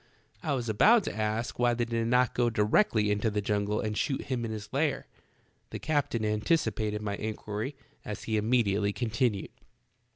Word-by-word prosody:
I 150 - -1
was 125 -3 -2
about 205 - +5
to - - -4
ask 110 +2 -2
why 120 -1 +3
they 120 0 0
did 115 -1 -1
not 125 0 +3
go 120 -1 +2
directly 105 - +2
into 105 +2 +1
the 105 0 -1
jungle 105 0 0
and 105 -1 -2
shoot 135 +5 -1
him 125 -3 -2
in 115 - -3
his 105 0 -7
lair. 140 0 0 0.6
The - - -5
captain 145 -7 0
anticipated 105 -2 0
my 100 -1 -2
inquiry, 110 +4 -4 0.3
as 105 - -6
he 110 -1 0
imme 120 +3 +3
diately 100 0 0
continued 115 -3 -1
110 Hz, 175 wpm, -29 LUFS, 105-125 Hz, 0.6 s, about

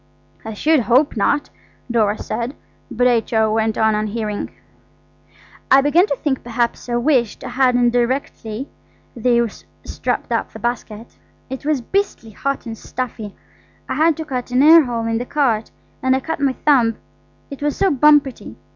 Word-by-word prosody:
"I 220 -1 -6
should 310 +7 +3
hope 250 +5 +2
not," 285 +7 0 0.4
Dora 215 -3 +2
said, 240 +4 -4 0.3
but 245 +2 0
H.O. 225 -2 +2
went 220 0 0
on 220 0 +3
unhearing. 210 0 -3 1.2
"I 270 +1 +7
began 315 +7 +3
to 280 - -1
think 265 -1 -2
perhaps 235 +1 -2
I 240 - 0
wished 240 -3 +1
I - - -5
hadn't 245 -2 +2
directly 245 -1 -2 0.5
they 235 0 +2 0.4
strapped - - -3
up - - -1
the - - -8
basket. 230 -2 -5 0.3
It 265 +1 -6
was 300 -4 +1
beastly 385 - -2
hot 275 +6 -3
and 225 -1 -6
stuffy–I 225 -3 -8
had 320 0 +2
to 320 - -5
cut 255 -4 -4
an 250 +2 +3
air 320 0 +8
hole 235 -2 -3
in 225 0 -1
the 245 - -4
cart, 240 -7 0 0.3
and 260 0 +2
I - - +1
cut 320 +4 -4
my 275 -2 +1
thumb; 250 -6 +2 0.6
it 280 - -8
was 295 0 -1
so 390 - +2
bumpety. 290 -1 +2
245 Hz, 160 wpm, -19 LUFS, 225-280 Hz, 1.2 s, air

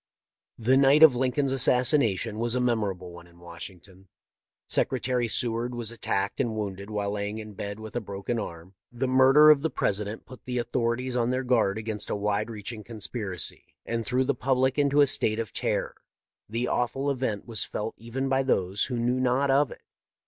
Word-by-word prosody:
" - - -66
The 125 +4 +3
night 140 +3 +6
of 150 -6 +8
Lincoln's 130 +2 0
assassination 125 - +2
was 120 +1 0
a - - +1
mem 120 -2 +2
orable 95 -4 -4
one 85 0 -12
in 85 0 -21
Washington. 90 +2 -10 0.6
Secretary 125 -2 0
Seward 120 +2 0
was 120 -2 -2
attacked 100 -4 -2
and 115 -2 0
wounded 100 -1 -5
while 105 -1 -2
lying 105 +1 -3
in 110 -1 -8
bed 100 +1 -6
with 110 +1 -9
a 120 - -1
broken 100 +3 -4
arm. 85 -2 -8
" - - -66
The 120 +2 -2
murder 135 +4 +7
of 145 -2 +4
the 160 - 0
President 105 -2 -2
put 130 -1 -13
the 125 -1 -3
authorities 120 +1 -1
on 120 -1 +1
their 130 +1 -1
guard 115 -5 +2
against 110 -1 -4
a - - -1
wide 105 +2 -1
reaching 110 0 -6
conspiracy, 105 -5 -4
and 115 0 -2
threw 125 +3 +1
the 140 +2 +1
public 130 +2 +1
into 145 0 +4
a - - +7
state 110 -5 +1
of 115 -2 -4
terror. - - -1 0.6
The 115 +3 -1
awful 135 +4 0
event 125 -6 -2
was 115 -2 0
felt 110 +1 -4
even 120 +4 -3
by 135 0 +2
those 100 -7 0
who 125 -2 -3
knew 120 +2 0
not 130 +2 +2
of 140 +1 +3
it. - - -12
115 Hz, 195 wpm, -27 LUFS, 105-130 Hz, 0.6 s, of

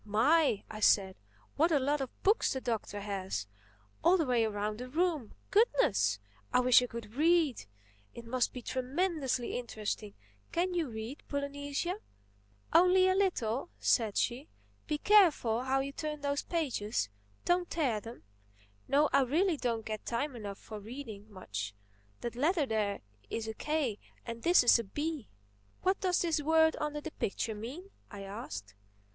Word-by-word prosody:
"My!" 230 +3 +3
I 215 - -8
said, 195 -3 +4 0.4
"what 325 +4 +4
a 305 - +5
lot 285 +2 +1
of 265 - -7
books 415 +4 +3
the 265 - -2
Doctor 220 -4 -3
has—all 105 - -2
the 325 - +1
way 245 -3 +2
around 210 0 -2
the 250 0 -6
room! 315 - -1 0.2
Goodness! 105 - +3 0.3
I - - +4
wish 250 -1 +6
I 250 - -2
could 230 -2 -8
read! 310 - +2 0.5
It 235 - -9
must 245 +1 0
be 250 - -8
tremendously 265 -2 -1
interesting. 215 -3 -4 0.4
Can 360 +2 0
you 335 -6 0
read, 225 +5 -6
Polynesia?" 285 +6 -3 0.7
"Only 365 +2 +6
a 375 - +4
little," 345 - 0
said 220 -4 +2
she. 255 +5 -1 0.4
"Be 300 - 0
careful 295 - +4
how 270 +1 +2
you 275 +1 -4
turn 300 +1 -5
those 285 0 0
pages—don't 215 - -2
tear 265 -10 0
them. 230 - -10 0.6
No, 295 +2 +4
I - - +6
really 325 +8 +2
don't 235 -5 -2
get 215 -1 -4
time 255 +4 -2
enough 205 -4 -6
for 215 -1 -9
reading—much. 205 - -7 0.5
That 240 0 -4
letter 305 +4 +2
there 210 -4 -1 0.3
is 225 -1 -3
a 220 - -3
k 285 -5 -1 0.3
and 230 -1 -6
this 345 -1 +5
is 240 - +6
a - - -2
b." 295 +6 -4 0.5
"What 375 +1 +2
does 365 -2 +2
this 325 -3 +1
word 320 +1 +4
under 300 0 -2
the 320 - -6
picture 220 -1 -2
mean?" 265 - -8 0.2
I 200 -2 -8
asked. 105 - -7
255 Hz, 155 wpm, -32 LUFS, 215-315 Hz, 0.7 s, wish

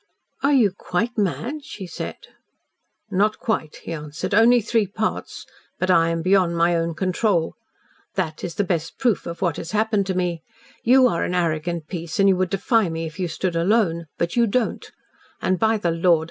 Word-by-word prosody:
"Are 280 - +3
you 230 -8 +4
QUITE 200 +5 -2
mad?" 235 - -2
she 195 - -8
said. 175 - -6 1.0
"Not 205 +3 +2
quite," 185 -9 -2
he - - -5
answered; 150 +3 -5
"only 235 +3 +6
three 225 -1 +1
parts 215 +3 -3 0.3
but 185 0 +1
I 165 -2 +4
am 165 0 -2
beyond 185 -2 +3
my 170 +1 +3
own 165 0 -1
control. 185 -1 0 0.6
That 155 0 -2
is 170 -2 -4
the 205 - +1
best 170 -3 -2
proof 245 -7 +1
of 170 +2 -5
what 170 -4 0
has 165 - -6
happened 215 -2 +1
to 190 - -1
me. 175 -3 -1 0.4
You 255 +2 +6
are 170 -8 0
an 180 - -2
arrogant 165 -1 -1
piece 170 +1 -5
and 195 - +5
you 195 - +5
would 185 -1 0
defy 200 +1 +2
me 165 0 -3
if 160 +1 -8
you 180 - 0
stood 170 +2 -2
alone, 170 -2 +1
but 170 0 -1
you 235 -1 +4
don't, 230 +2 -1 0.5
and, 185 -1 0
by 220 0 +3
the 175 -5 0
Lord! 165 0 +3
185 Hz, 190 wpm, -22 LUFS, 170-215 Hz, 1.0 s, only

